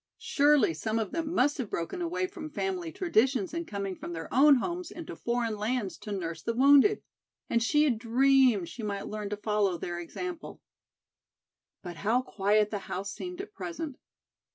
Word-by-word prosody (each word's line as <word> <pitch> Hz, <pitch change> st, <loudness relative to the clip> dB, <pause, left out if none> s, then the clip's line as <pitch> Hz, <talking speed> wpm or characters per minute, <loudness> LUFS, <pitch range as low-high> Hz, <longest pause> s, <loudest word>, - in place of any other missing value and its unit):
Surely 290 Hz, -, +3 dB
some 220 Hz, +8 st, -2 dB
of 220 Hz, -2 st, -2 dB
them 325 Hz, -1 st, -2 dB
must 290 Hz, -2 st, +2 dB
have 240 Hz, -6 st, -3 dB
broken 170 Hz, -, -3 dB
away 350 Hz, +2 st, -1 dB
from 355 Hz, -4 st, -7 dB
family 360 Hz, +1 st, -3 dB
traditions 265 Hz, -, +1 dB
in 335 Hz, 0 st, -3 dB
coming 200 Hz, -2 st, -4 dB
from 175 Hz, -, -7 dB
their 165 Hz, -1 st, -5 dB
own 285 Hz, +3 st, +7 dB
homes 345 Hz, +6 st, -3 dB
into 335 Hz, -1 st, -8 dB
foreign 235 Hz, -2 st, -1 dB
lands 210 Hz, -1 st, -2 dB
to 210 Hz, -, -9 dB
nurse 165 Hz, -5 st, -4 dB
the 230 Hz, -, -2 dB
wounded! 285 Hz, -, +5 dB, 0.5 s
And 230 Hz, -, +3 dB
she 295 Hz, +6 st, +3 dB
had 255 Hz, -7 st, +1 dB
dreamed 250 Hz, -4 st, +4 dB
she 240 Hz, -, -8 dB
might 200 Hz, -2 st, -3 dB
learn 210 Hz, -1 st, -4 dB
to 210 Hz, -, -3 dB
follow 210 Hz, -3 st, 0 dB
their 175 Hz, +1 st, -4 dB
example. 340 Hz, -, -6 dB, 1.2 s
But 175 Hz, -3 st, -7 dB
how 230 Hz, +7 st, +1 dB
quiet 210 Hz, -1 st, +1 dB
the 205 Hz, -, -2 dB
house 195 Hz, +2 st, -3 dB
seemed 360 Hz, +1 st, -6 dB
at 405 Hz, +1 st, -11 dB
present. 325 Hz, -7 st, -6 dB
245 Hz, 175 wpm, -29 LUFS, 205-320 Hz, 1.2 s, own